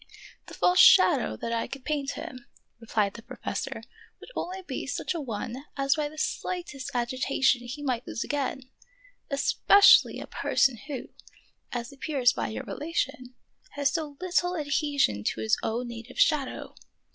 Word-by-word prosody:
" -, -, -20 dB
The -, -, -10 dB
false 360 Hz, 0 st, +3 dB
shadow 475 Hz, 0 st, +6 dB
that 230 Hz, -, -4 dB
I 230 Hz, -, -1 dB
could 275 Hz, -1 st, -9 dB
paint 285 Hz, -2 st, -1 dB
him," 250 Hz, -2 st, -8 dB, 0.3 s
re 230 Hz, -, -14 dB
plied 205 Hz, -3 st, +1 dB
the 230 Hz, -, -10 dB
professor, -, -, -5 dB, 0.2 s
" -, -, -25 dB
would -, -, -13 dB
only 375 Hz, +1 st, -4 dB
be -, -, -5 dB
such -, -, -2 dB
a 335 Hz, -, -3 dB
one 245 Hz, +2 st, -5 dB
as 275 Hz, 0 st, +3 dB
by 300 Hz, -2 st, -2 dB
the 310 Hz, -, -14 dB
slightest 325 Hz, -5 st, -3 dB
agitation 250 Hz, +1 st, +1 dB
he 285 Hz, +4 st, -6 dB
might 250 Hz, -4 st, -2 dB
lose -, -, -3 dB
again, 280 Hz, -2 st, -2 dB, 0.7 s
especially 320 Hz, +7 st, +5 dB
a -, -, -6 dB
person 265 Hz, -4 st, +1 dB
who, 275 Hz, -5 st, -5 dB, 0.6 s
as 240 Hz, +2 st, -4 dB
appears 270 Hz, -3 st, +1 dB
by -, -, -2 dB
your 220 Hz, -, -5 dB
rela 325 Hz, +3 st, -7 dB
tion, 255 Hz, -4 st, -2 dB, 0.4 s
has 285 Hz, -1 st, +1 dB
so 305 Hz, -4 st, -3 dB
little 360 Hz, 0 st, 0 dB
adhesion 285 Hz, -, +1 dB
to 110 Hz, -, -1 dB
his 110 Hz, -, +3 dB
own 240 Hz, +2 st, -2 dB
native 235 Hz, +2 st, -9 dB
shadow. 290 Hz, -4 st, +1 dB
275 Hz, 170 wpm, -27 LUFS, 245-305 Hz, 0.7 s, shadow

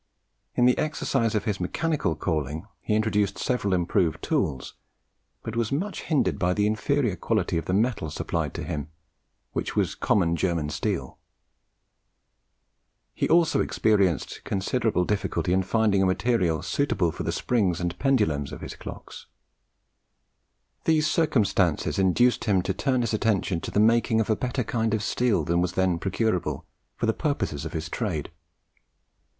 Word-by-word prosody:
In 120 Hz, -, +4 dB
the 125 Hz, -, +5 dB
exercise 135 Hz, -6 st, 0 dB
of 105 Hz, -, +1 dB
his 105 Hz, -2 st, -1 dB
mechanical 100 Hz, -, -1 dB
calling, 80 Hz, 0 st, -2 dB
he 105 Hz, -, -1 dB
introduced 105 Hz, -2 st, +1 dB
several 125 Hz, -6 st, -1 dB
improved 90 Hz, -2 st, +1 dB
tools, 65 Hz, -, -1 dB, 0.7 s
but 115 Hz, -, -5 dB
was 115 Hz, -2 st, 0 dB
much 185 Hz, +9 st, -2 dB
hindered 115 Hz, -, 0 dB
by 90 Hz, +1 st, +1 dB
the 105 Hz, -, +2 dB
inferior 110 Hz, +1 st, +1 dB
quality -, -, -1 dB
of 80 Hz, -, -7 dB
the 90 Hz, -, -1 dB
metal 110 Hz, -7 st, 0 dB
supplied -, -, -3 dB
to -, -, -4 dB
him, 75 Hz, -1 st, -4 dB, 0.7 s
which -, -, -3 dB
was -, -, +1 dB
common 85 Hz, -5 st, +1 dB
German 85 Hz, -4 st, -1 dB
steel. 75 Hz, -, -3 dB, 1.9 s
He -, -, -1 dB
also 165 Hz, -1 st, +4 dB
experienced 100 Hz, -8 st, +1 dB
considerable 100 Hz, -1 st, 0 dB
difficulty 100 Hz, -3 st, -1 dB
in 95 Hz, -, +3 dB
finding 100 Hz, 0 st, +2 dB
a 95 Hz, -, +3 dB
material 95 Hz, -5 st, +1 dB
suitable 95 Hz, -, 0 dB
for -, -, -7 dB
the -, -, -1 dB
springs 100 Hz, -8 st, 0 dB
and 90 Hz, 0 st, -3 dB
pendulums 105 Hz, -, +1 dB
of -, -, -8 dB
his -, -, -7 dB
clocks. -, -, -10 dB, 1.6 s
These 155 Hz, -2 st, +3 dB
circumstances 100 Hz, -, +1 dB
induced 110 Hz, +7 st, +3 dB
him 95 Hz, -5 st, +2 dB
to -, -, -1 dB
turn 130 Hz, -3 st, 0 dB
his 115 Hz, -2 st, -1 dB
attention 100 Hz, -5 st, 0 dB
to -, -, -5 dB
the -, -, 0 dB
making 115 Hz, +1 st, +3 dB
of 110 Hz, -, +1 dB
a -, -, +3 dB
better 125 Hz, +3 st, -2 dB
kind 110 Hz, -1 st, 0 dB
of 110 Hz, -, -2 dB
steel 120 Hz, +1 st, +1 dB
than 85 Hz, 0 st, +1 dB
was 90 Hz, 0 st, -1 dB
then 95 Hz, -2 st, +1 dB
procurable, 100 Hz, -1 st, -1 dB, 0.3 s
for -, -, -2 dB
the 110 Hz, -, +2 dB
purposes 140 Hz, -, -2 dB
of -, -, -6 dB
his 80 Hz, 0 st, -3 dB
trade. 85 Hz, -6 st, -3 dB
105 Hz, 155 wpm, -26 LUFS, 90-120 Hz, 1.9 s, the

